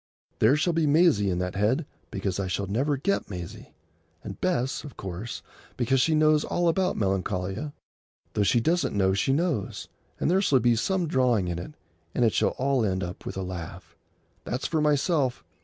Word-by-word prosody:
There 115 +6 +5
shall 170 +3 +1
be 165 -2 +2
Maisie 145 - +4
in 90 - 0
that 90 0 -2
head, 110 +10 +1 0.2
because 95 -1 -3
I 95 - -1
shall 100 +2 -2
never 135 +9 0
get 195 - -1
Maisie; 90 -4 -8 0.5
and 100 - -8
Bess, 140 -8 0
of 145 -4 -10
course, 95 +5 -6 0.3
because 125 +2 +2
she 160 +3 +3
knows 155 0 +4
all 175 0 0
about 180 +2 +1
Melancolia, 95 - -1 0.6
though - - 0
she 100 +4 +3
doesn't 150 -3 +1
know 95 -1 +3
she 100 +7 +1
knows; 150 - -1 0.3
and - - 0
there 185 +4 +3
shall 140 -9 +3
be 120 0 +3
some 180 - 0
drawing 125 - +2
in 85 -1 -3
it, 150 - -8 0.4
and 125 - +3
it 110 - +2
shall - - +1
all 135 -2 +1
end 95 -2 0
up 90 +1 -7
with - - -5
a 95 - -2
laugh. 85 -2 -7 0.5
That's 125 - -3
for 160 -2 0
myself. 150 -2 +1
120 Hz, 190 wpm, -26 LUFS, 95-150 Hz, 0.6 s, There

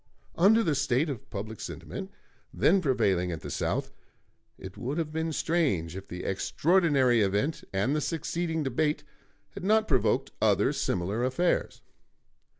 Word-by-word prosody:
Under 215 +7 +5
the 160 - +1
state 140 +1 +1
of 125 - -8
public 105 +2 -6
sentiment - - -7 0.4
then 160 - +3
prevailing 100 - +1
at 80 - -5
the - - -7
South, - - -2 0.7
it 95 0 -9
would 135 +5 -4
have 160 -2 -2
been 160 +1 -2
strange 140 - 0
if 95 0 -8
the 90 0 -7
extraordinary 140 - +2
event 105 +11 0
and 100 +9 0
the 150 - 0
succeeding 165 0 -2
debate 150 +3 0 0.5
had - - -9
not 215 +2 +3
provoked 130 -4 +1
other - - +3
similar 95 +6 -1
affairs. 150 +8 0
140 Hz, 145 wpm, -28 LUFS, 100-165 Hz, 0.7 s, Under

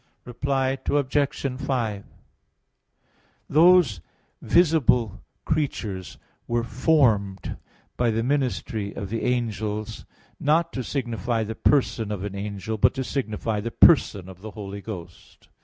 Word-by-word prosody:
Reply 135 +1 -1
Obj. 140 -2 0
5: 115 -7 -1 1.4
Those 160 - +5 0.4
visible 135 - +3 0.2
creatures 105 - -2 0.3
were 120 0 0
formed 115 - +1 0.4
by 120 -1 +2
the 115 0 0
ministry 120 -6 -1
of 100 0 -6
the 115 - -2
angels, 110 -3 -2 0.3
not 165 +3 +2
to 130 - -3
signify 120 -3 -2
the 110 +1 -4
person 115 -3 +1
of 100 -3 -4
an 100 -1 -4
angel, 100 +2 -4
but - - +4
to 130 - -2
signify 110 -5 -2
the 110 +3 -3
Person 110 - +4
of 95 -1 -12
the 110 - -7
Holy 100 -1 -7
Ghost. 90 -5 -10
115 Hz, 120 wpm, -25 LUFS, 105-135 Hz, 1.4 s, Those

